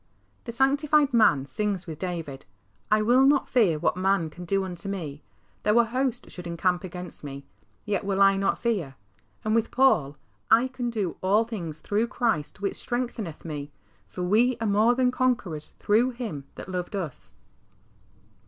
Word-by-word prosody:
The 235 Hz, -, -4 dB
sanctified 285 Hz, +3 st, +3 dB
man 180 Hz, -, +4 dB
sings 190 Hz, +6 st, -2 dB
with 160 Hz, -3 st, -7 dB
David, 165 Hz, -, -5 dB, 0.2 s
" -, -, -40 dB
I 215 Hz, 0 st, +4 dB
will 245 Hz, +4 st, +5 dB
not 275 Hz, 0 st, +4 dB
fear 205 Hz, -11 st, +3 dB
what 150 Hz, -, +1 dB
man 185 Hz, -3 st, +1 dB
can 175 Hz, +2 st, -9 dB
do 195 Hz, +2 st, +1 dB
unto 180 Hz, 0 st, -6 dB
me; 155 Hz, -7 st, -5 dB, 0.4 s
though 210 Hz, +2 st, +3 dB
a 235 Hz, -, +7 dB
host 255 Hz, +2 st, -2 dB
should 180 Hz, -1 st, -8 dB
encamp 175 Hz, +2 st, 0 dB
against 180 Hz, -2 st, -8 dB
me, 140 Hz, -1 st, -7 dB, 0.4 s
yet 205 Hz, -2 st, -1 dB
will 195 Hz, -1 st, -1 dB
I 195 Hz, 0 st, +6 dB
not 195 Hz, 0 st, +1 dB
fear." 190 Hz, -, -1 dB, 0.5 s
And 215 Hz, -, +1 dB
with 230 Hz, 0 st, +2 dB
Paul, 170 Hz, -, +3 dB, 0.2 s
" 95 Hz, +1 st, -42 dB
I 260 Hz, +2 st, -2 dB
can 250 Hz, -2 st, -3 dB
do 210 Hz, -7 st, -2 dB
all 200 Hz, +4 st, +3 dB
things 175 Hz, -9 st, -6 dB
through 215 Hz, +3 st, 0 dB
Christ 225 Hz, -, -1 dB
which 200 Hz, -, -1 dB
strengtheneth 235 Hz, -10 st, -4 dB
me, 145 Hz, -3 st, -5 dB, 0.4 s
for 180 Hz, -, -5 dB
we 225 Hz, +7 st, +3 dB
are 225 Hz, -, -2 dB
more 215 Hz, +4 st, +4 dB
than 250 Hz, 0 st, +2 dB
conquerors 220 Hz, -13 st, -1 dB
through 225 Hz, +5 st, +3 dB
Him 165 Hz, -, -5 dB
that -, -, -8 dB
loved 180 Hz, +2 st, -4 dB
us." 170 Hz, -8 st, -6 dB
200 Hz, 175 wpm, -26 LUFS, 170-235 Hz, 0.5 s, a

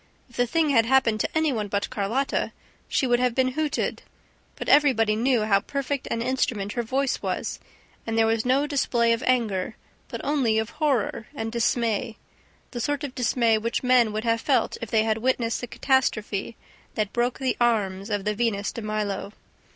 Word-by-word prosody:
If -, -, -17 dB
the 245 Hz, 0 st, +1 dB
thing 320 Hz, +1 st, +2 dB
had 230 Hz, -4 st, +4 dB
happened 240 Hz, -4 st, +3 dB
to -, -, -1 dB
any 315 Hz, -3 st, +2 dB
one 215 Hz, -3 st, -2 dB
but 200 Hz, 0 st, -2 dB
Carlotta, 225 Hz, +7 st, -1 dB, 0.3 s
she -, -, +1 dB
would 240 Hz, -1 st, +2 dB
have 250 Hz, -2 st, +1 dB
been 260 Hz, -1 st, +2 dB
hooted. 300 Hz, +3 st, -2 dB, 0.5 s
But -, -, -6 dB
everybody 245 Hz, -7 st, +4 dB
knew 240 Hz, 0 st, +2 dB
how 200 Hz, -2 st, +3 dB
perfect 280 Hz, +4 st, -3 dB
an 230 Hz, -, -1 dB
instrument 240 Hz, -5 st, -1 dB
her 240 Hz, -, -1 dB
voice 265 Hz, +3 st, -1 dB
was; -, -, -3 dB, 0.5 s
and 225 Hz, 0 st, -1 dB
there 225 Hz, -, +4 dB
was 225 Hz, 0 st, +1 dB
no 265 Hz, +3 st, +2 dB
display 240 Hz, -5 st, +2 dB
of 230 Hz, -, -2 dB
anger, 220 Hz, -5 st, 0 dB, 0.3 s
but -, -, -6 dB
only 260 Hz, -7 st, +1 dB
of 220 Hz, 0 st, -1 dB
horror 265 Hz, -8 st, -1 dB
and 225 Hz, -3 st, -3 dB
dismay, 230 Hz, -1 st, 0 dB, 0.5 s
the 240 Hz, -, -4 dB
sort 290 Hz, +3 st, -1 dB
of 280 Hz, -3 st, -4 dB
dismay 235 Hz, -3 st, +2 dB
which 230 Hz, +3 st, -2 dB
men 250 Hz, -3 st, +4 dB
would 215 Hz, +1 st, -3 dB
have 230 Hz, -1 st, +1 dB
felt 275 Hz, -, +1 dB
if 230 Hz, -, -5 dB
they 220 Hz, -1 st, +3 dB
had 220 Hz, 0 st, 0 dB
witnessed 235 Hz, -1 st, 0 dB
the 245 Hz, -, -5 dB
catastrophe 225 Hz, -5 st, 0 dB, 0.4 s
that 210 Hz, -1 st, -1 dB
broke 240 Hz, +1 st, 0 dB
the 260 Hz, -2 st, -1 dB
arms 200 Hz, -4 st, +1 dB
of 205 Hz, -2 st, -2 dB
the 210 Hz, -, +1 dB
Venus 205 Hz, -3 st, -1 dB
de 230 Hz, -, -6 dB
Milo... 210 Hz, -2 st, -3 dB
235 Hz, 190 wpm, -25 LUFS, 215-260 Hz, 0.5 s, had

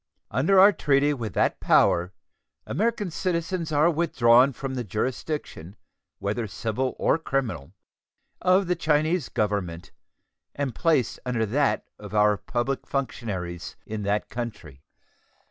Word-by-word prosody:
Under 155 Hz, -, +3 dB
our 200 Hz, +2 st, +8 dB
treaty 145 Hz, -1 st, +2 dB
with 115 Hz, -6 st, -5 dB
that -, -, +1 dB
power 90 Hz, +2 st, +3 dB, 0.5 s
American 215 Hz, -3 st, -1 dB
citizens 170 Hz, -1 st, -2 dB
are 155 Hz, +3 st, +4 dB
withdrawn 130 Hz, -6 st, +4 dB
from 135 Hz, +1 st, -5 dB
the 125 Hz, -2 st, -3 dB
jurisdiction, 110 Hz, -, -4 dB, 0.4 s
whether 105 Hz, +3 st, -2 dB
civil 115 Hz, +5 st, -2 dB
or -, -, +2 dB
criminal, 130 Hz, -, -3 dB, 0.7 s
of 185 Hz, +2 st, +4 dB
the 180 Hz, 0 st, 0 dB
Chinese 155 Hz, +1 st, +1 dB
Government 95 Hz, -5 st, -2 dB, 0.6 s
and 140 Hz, -3 st, -2 dB
placed 155 Hz, -9 st, +1 dB
under 120 Hz, -3 st, 0 dB
that 135 Hz, +7 st, +1 dB
of 105 Hz, 0 st, -8 dB
our 105 Hz, 0 st, +4 dB
public 120 Hz, +6 st, -3 dB
functionaries 100 Hz, -, -4 dB
in 110 Hz, -1 st, -5 dB
that 100 Hz, +1 st, -1 dB
country. 105 Hz, -, -7 dB
130 Hz, 125 wpm, -25 LUFS, 105-155 Hz, 0.7 s, our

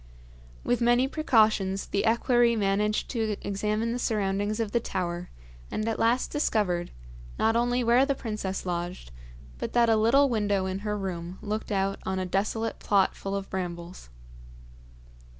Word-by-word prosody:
With 245 Hz, 0 st, 0 dB
many 240 Hz, +2 st, +4 dB
precautions 215 Hz, -9 st, +2 dB
the 200 Hz, +2 st, -1 dB
equerry 235 Hz, +1 st, +3 dB
managed 210 Hz, 0 st, +1 dB
to 220 Hz, -4 st, -1 dB
examine 210 Hz, +3 st, -1 dB
the 245 Hz, -, -2 dB
surroundings 205 Hz, -1 st, -1 dB
of 220 Hz, -3 st, -1 dB
the 235 Hz, -, +2 dB
tower, 180 Hz, -4 st, -3 dB, 0.4 s
and 215 Hz, -, -2 dB
at 225 Hz, -, -1 dB
last 235 Hz, +3 st, +2 dB
discovered, 200 Hz, -, 0 dB, 0.5 s
not 225 Hz, +1 st, +2 dB
only 245 Hz, +1 st, +1 dB
where 240 Hz, +3 st, +5 dB
the 275 Hz, 0 st, +1 dB
princess 210 Hz, -6 st, -4 dB
lodged, 175 Hz, -, -4 dB, 0.5 s
but -, -, -4 dB
that 235 Hz, -1 st, +4 dB
a 225 Hz, -, +5 dB
little 235 Hz, +6 st, +4 dB
window 205 Hz, -5 st, 0 dB
in 190 Hz, 0 st, -3 dB
her 210 Hz, 0 st, -2 dB
room 180 Hz, -2 st, -5 dB
looked 215 Hz, +1 st, -4 dB
out 195 Hz, 0 st, 0 dB
on 190 Hz, 0 st, -2 dB
a 185 Hz, -, -1 dB
desolate 210 Hz, +5 st, -1 dB
plot 195 Hz, -2 st, +2 dB
full 195 Hz, 0 st, -4 dB
of 195 Hz, -1 st, -4 dB
brambles. 175 Hz, -, -5 dB
210 Hz, 155 wpm, -27 LUFS, 190-230 Hz, 0.5 s, where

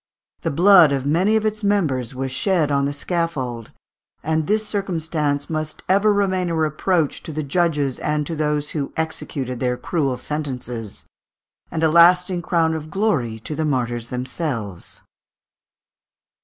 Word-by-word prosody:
The -, -, -1 dB
blood 175 Hz, 0 st, +6 dB
of 135 Hz, -1 st, -1 dB
many 180 Hz, +9 st, +2 dB
of 220 Hz, 0 st, +1 dB
its 215 Hz, 0 st, -1 dB
members 145 Hz, -, 0 dB
was 135 Hz, 0 st, -3 dB
shed 160 Hz, +1 st, +1 dB
on 140 Hz, 0 st, +2 dB
the 140 Hz, -, -1 dB
scaffold, 145 Hz, -, -3 dB, 0.5 s
and 155 Hz, 0 st, 0 dB
this 215 Hz, 0 st, +1 dB
circumstance 160 Hz, -8 st, -1 dB
must 155 Hz, -1 st, -4 dB
ever 200 Hz, +3 st, +4 dB
remain 190 Hz, -3 st, +1 dB
a 165 Hz, -, -1 dB
reproach 160 Hz, +1 st, 0 dB
to -, -, -8 dB
the 155 Hz, 0 st, -3 dB
judges 145 Hz, -3 st, 0 dB
and 150 Hz, 0 st, -1 dB
to 165 Hz, -, -4 dB
those 150 Hz, -1 st, -1 dB
who 145 Hz, -3 st, -3 dB
executed 140 Hz, -5 st, -3 dB
their 125 Hz, -1 st, 0 dB
cruel 140 Hz, -6 st, -1 dB
sentences, 125 Hz, -8 st, -5 dB, 0.6 s
and 160 Hz, -, -2 dB
a 160 Hz, -, +4 dB
lasting 180 Hz, +2 st, +5 dB
crown 165 Hz, -1 st, +1 dB
of 155 Hz, -1 st, -5 dB
glory 150 Hz, -, 0 dB
to 155 Hz, -, -5 dB
the 160 Hz, +1 st, -2 dB
martyrs 120 Hz, -5 st, -1 dB
themselves. 125 Hz, -, -5 dB
155 Hz, 150 wpm, -21 LUFS, 135-175 Hz, 0.6 s, blood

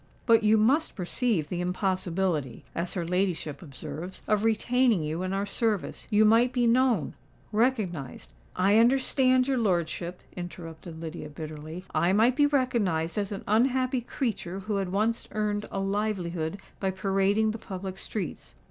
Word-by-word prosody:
But 230 Hz, -2 st, +5 dB
you 215 Hz, 0 st, +4 dB
must 270 Hz, +9 st, +2 dB
perceive 190 Hz, -, 0 dB
the 175 Hz, +3 st, -3 dB
impossibility, 180 Hz, -, -1 dB
as 170 Hz, +1 st, -3 dB
her 175 Hz, -2 st, -1 dB
ladyship 175 Hz, -5 st, -1 dB
observes, 155 Hz, +4 st, -7 dB
of 210 Hz, -1 st, +2 dB
retaining 225 Hz, -2 st, +2 dB
you 155 Hz, +3 st, -2 dB
in 185 Hz, 0 st, -2 dB
our 195 Hz, +1 st, -1 dB
service. 215 Hz, -1 st, -2 dB
You 215 Hz, -1 st, +5 dB
might 230 Hz, +3 st, +5 dB
be 245 Hz, -1 st, +1 dB
known—recognised——" 225 Hz, -, 0 dB, 0.2 s
"I 200 Hz, +4 st, +4 dB
understand 255 Hz, +1 st, +4 dB
your 265 Hz, -2 st, +1 dB
lordship," 175 Hz, -3 st, -1 dB
interrupted 170 Hz, -2 st, -8 dB
Lydia, 160 Hz, -1 st, -6 dB
bitterly; 155 Hz, +3 st, -7 dB
"I 175 Hz, +2 st, +3 dB
might 230 Hz, +5 st, +4 dB
be 290 Hz, +1 st, +4 dB
recognised 210 Hz, -, +1 dB
as 200 Hz, -1 st, -2 dB
an 200 Hz, -, -5 dB
unhappy 255 Hz, +3 st, +2 dB
creature 200 Hz, -7 st, -3 dB
who 210 Hz, +1 st, -2 dB
had 190 Hz, -2 st, -2 dB
once 220 Hz, +4 st, 0 dB
earned 210 Hz, -1 st, -1 dB
a 195 Hz, -, -3 dB
livelihood 195 Hz, -4 st, -1 dB, 0.2 s
by 195 Hz, -, 0 dB
parading 195 Hz, +3 st, +1 dB
the 220 Hz, -, -6 dB
public 190 Hz, -2 st, -6 dB
streets. 200 Hz, -6 st, -5 dB
195 Hz, 150 wpm, -28 LUFS, 175-225 Hz, 0.2 s, But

